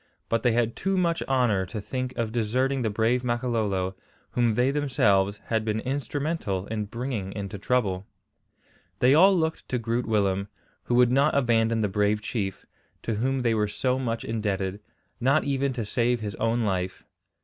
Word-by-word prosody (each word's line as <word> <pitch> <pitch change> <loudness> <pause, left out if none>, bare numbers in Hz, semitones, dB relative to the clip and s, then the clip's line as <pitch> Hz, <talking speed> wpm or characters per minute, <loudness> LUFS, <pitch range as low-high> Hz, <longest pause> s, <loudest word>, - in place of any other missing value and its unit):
But 115 -1 +1
they 120 -1 +3
had 115 -1 +1
too 195 0 -1
much 170 -2 +1
honour 120 -8 +2
to 105 - -5
think 130 +5 -4
of 115 -2 -1
deserting 125 +4 0
the 110 - 0
brave 115 +4 +1
Makololo, 110 -6 -1 0.4
whom 120 -3 +2
they 125 +3 +3
themselves 105 -9 +2
had 110 -1 0
been 110 0 -1
instrumental 140 - -2
in 110 -1 -3
bringing 115 -3 -4
into 100 -1 -5
trouble. 100 -4 0 0.9
They 125 +2 +4
all 190 +5 +6
looked 160 -1 -2
to 125 - 0
Groot 115 +1 -2
Willem, 100 -3 +1 0.4
who 120 - 0
would 125 0 +5
not 135 +2 +3
abandon 115 -3 +2
the 105 - +2
brave 105 +1 +1
chief, 105 -3 -4 0.4
to 115 - -1
whom 130 +5 0
they 115 -2 +2
were 105 -1 +1
so 125 +5 -1
much 115 -3 -2
indebted, 100 -3 -2 0.4
not 135 +5 +3
even 140 -1 0
to 120 -3 -3
save 120 +3 +1
his 105 -2 -4
own 115 +1 +1
life. 95 -3 -2
115 Hz, 170 wpm, -26 LUFS, 105-130 Hz, 0.9 s, all